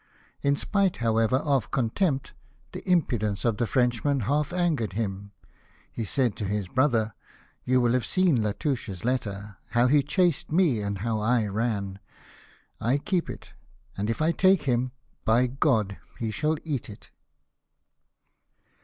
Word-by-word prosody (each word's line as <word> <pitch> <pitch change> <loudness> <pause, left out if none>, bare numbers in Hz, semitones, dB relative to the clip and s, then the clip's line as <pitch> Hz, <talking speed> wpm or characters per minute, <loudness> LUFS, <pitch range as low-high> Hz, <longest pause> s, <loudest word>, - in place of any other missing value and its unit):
In 140 0 +2
spite, 195 +5 0
however, 115 +1 +2
of 140 -2 +1
contempt, 135 - 0 0.4
the - - -7
impudence 110 - +1
of 115 -3 +1
this 120 - -1
Frenchman 130 +2 +1
half 145 - 0
angered 165 - 0
him. 100 -2 -3 0.6
He 115 - -4
said 125 0 +1
to 105 - -3
his 100 -1 -2
brother: 115 -2 +1 0.3
" - - -33
You 130 0 +3
will 120 -1 +2
have 125 -1 +1
seen 185 -7 +3
Latouche's 105 - -2
letter; 105 -5 -2 0.2
how 120 +1 +4
he 145 +3 +5
chased 170 +2 +1
me, 155 - +3
and 100 -1 -2
how 110 +2 -1
I 115 +1 +2
ran. 100 -2 -2 0.8
I 125 +5 +2
keep 175 +4 -1
it, - - -9 0.4
and 105 +2 -2
if 115 +7 -1
I 160 - +3
take 190 +1 +3
him, 125 -1 0 0.3
by 115 +3 +4
God 120 -6 +1 0.2
he 115 -2 -2
shall 155 +7 0
eat 140 -7 -3
it." 105 - -12
120 Hz, 150 wpm, -26 LUFS, 110-145 Hz, 0.8 s, he